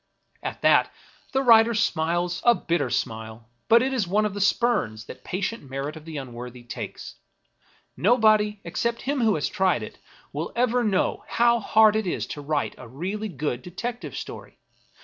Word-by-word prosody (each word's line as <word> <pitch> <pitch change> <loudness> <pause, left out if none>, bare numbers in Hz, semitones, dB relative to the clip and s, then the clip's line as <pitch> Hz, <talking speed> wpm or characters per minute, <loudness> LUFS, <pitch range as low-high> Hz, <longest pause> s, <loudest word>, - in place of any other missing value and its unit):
At - - -6
that, - - +5 0.4
the 265 - +1
weary 270 - -5
writer 230 0 +7
smiles 175 -2 0
a 240 -1 +6
bitter 170 - -1
smile; 110 0 -4 0.2
but 230 +2 +6
it 265 +1 -1
is 225 -8 0
one 210 +4 +2
of 210 - -2
the 205 - -4
spurns 190 - +1
that - - -11
patient 190 - -4
merit 135 +3 -4
of 155 -1 -11
the 160 -2 -6
unworthy 125 -2 -8
takes. 120 - -7 0.8
Nobody, 215 -1 +3
except 230 +7 -2
him 275 0 -1
who 220 -3 +3
has 150 - -1
tried 185 - +1
it, - - -10 0.3
will 150 +4 -3
ever 245 0 +2
know 200 -4 0
how 235 0 +3
hard 220 0 +5
it 220 -3 0
is - - -2
to 145 - -8
write 145 0 -1
a 125 - -10
really 190 - -4
good 140 -6 -3
detective 235 +7 -6
story. - - -8
190 Hz, 175 wpm, -25 LUFS, 145-225 Hz, 0.8 s, writer